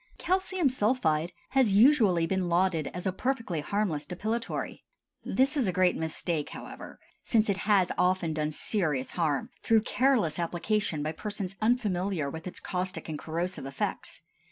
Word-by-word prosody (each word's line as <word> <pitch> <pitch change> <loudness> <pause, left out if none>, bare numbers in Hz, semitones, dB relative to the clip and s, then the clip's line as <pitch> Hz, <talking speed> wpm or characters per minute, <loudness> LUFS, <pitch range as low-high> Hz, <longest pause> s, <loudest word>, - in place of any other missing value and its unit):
CALCIUM 370 -3 +1
SULPHIDE 205 -10 +1 0.2
has 260 -6 +3
usually 210 - +5
been 185 0 -1
lauded 170 -3 +2
as 180 +1 -6
a 190 - +2
perfectly 225 - -2
harmless 180 -3 -1
depilatory. 220 +6 -3 0.4
This 270 +3 +1
is 265 -7 +1
a - - +2
great 185 0 +3
mistake, 160 -1 -2
however, - - -9 0.2
since 220 -3 +2
it 195 - -2
has 195 -3 +4
often 180 -2 +2
done 155 0 -1
serious 155 - -1
harm, 170 - -1
through 225 -2 +4
careless 240 - +2
application 175 -1 -1
by 155 - -1
persons 195 +2 -5
unfamiliar 195 - +1
with 160 +3 -7
its 180 - -4
caustic 185 -1 -3
and 150 -2 -4
corrosive 170 -2 -3
effects. 135 - -3
185 Hz, 150 wpm, -29 LUFS, 165-220 Hz, 0.4 s, usually